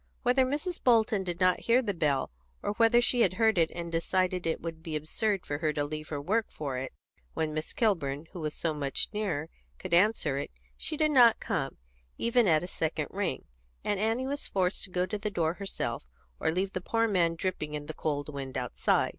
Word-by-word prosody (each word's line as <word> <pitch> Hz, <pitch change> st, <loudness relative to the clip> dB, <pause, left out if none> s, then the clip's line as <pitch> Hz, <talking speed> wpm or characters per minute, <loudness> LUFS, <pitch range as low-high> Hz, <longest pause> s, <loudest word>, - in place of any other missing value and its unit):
Whether 255 Hz, +1 st, +4 dB
Mrs. 305 Hz, +6 st, -3 dB
Bolton 220 Hz, -5 st, +4 dB
did 175 Hz, -2 st, -4 dB
not 185 Hz, -1 st, +4 dB
hear 240 Hz, +2 st, +7 dB
the 205 Hz, -3 st, -1 dB
bell, 145 Hz, -, 0 dB, 0.3 s
or -, -, 0 dB
whether 230 Hz, +2 st, +5 dB
she 245 Hz, 0 st, +3 dB
heard 220 Hz, +1 st, +3 dB
it 165 Hz, -1 st, +4 dB
and 170 Hz, -1 st, -6 dB
decided 180 Hz, +2 st, +1 dB
that 165 Hz, -, -1 dB
it 160 Hz, -, -1 dB
would 165 Hz, -1 st, -6 dB
be 160 Hz, -1 st, -5 dB
absurd 190 Hz, +6 st, -1 dB
to 145 Hz, 0 st, -1 dB
leave 155 Hz, +1 st, -6 dB
her 145 Hz, -, -3 dB
work 215 Hz, +10 st, 0 dB
for 140 Hz, -4 st, -4 dB
it, 130 Hz, 0 st, -5 dB, 0.4 s
when 155 Hz, -1 st, -1 dB
Miss 155 Hz, +1 st, -3 dB
Kilburn, 160 Hz, -, 0 dB
who 180 Hz, -, -7 dB
was 155 Hz, -2 st, -3 dB
so 165 Hz, -2 st, -1 dB
much 140 Hz, -3 st, -1 dB
nearer, 185 Hz, -8 st, -1 dB, 0.3 s
could 185 Hz, -2 st, -6 dB
answer 170 Hz, -7 st, +3 dB
it, -, -, -4 dB, 0.3 s
she 310 Hz, -, -3 dB
did 305 Hz, 0 st, +3 dB
not 245 Hz, -5 st, +7 dB
come, 135 Hz, -5 st, -2 dB, 0.4 s
even 235 Hz, -1 st, +3 dB
at 160 Hz, -1 st, +4 dB
a -, -, -4 dB
second 160 Hz, -3 st, -2 dB
ring, 190 Hz, -9 st, -2 dB, 0.4 s
and 205 Hz, -, 0 dB
Annie 225 Hz, +5 st, +1 dB
was 280 Hz, +1 st, -2 dB
forced 185 Hz, -1 st, 0 dB
to -, -, -13 dB
go 180 Hz, 0 st, 0 dB
to 210 Hz, +2 st, -4 dB
the 210 Hz, -, -2 dB
door 165 Hz, -5 st, 0 dB
herself, 195 Hz, -, -4 dB, 0.3 s
or -, -, +1 dB
leave 190 Hz, +3 st, -1 dB
the 185 Hz, -, -2 dB
poor 230 Hz, +4 st, +1 dB
man 175 Hz, -5 st, +2 dB
dripping 165 Hz, -4 st, -3 dB
in 145 Hz, 0 st, -5 dB
the 155 Hz, -, -6 dB
cold 145 Hz, -2 st, -2 dB
wind 140 Hz, -3 st, -5 dB
outside. 125 Hz, -1 st, +1 dB
180 Hz, 210 wpm, -30 LUFS, 155-215 Hz, 0.4 s, hear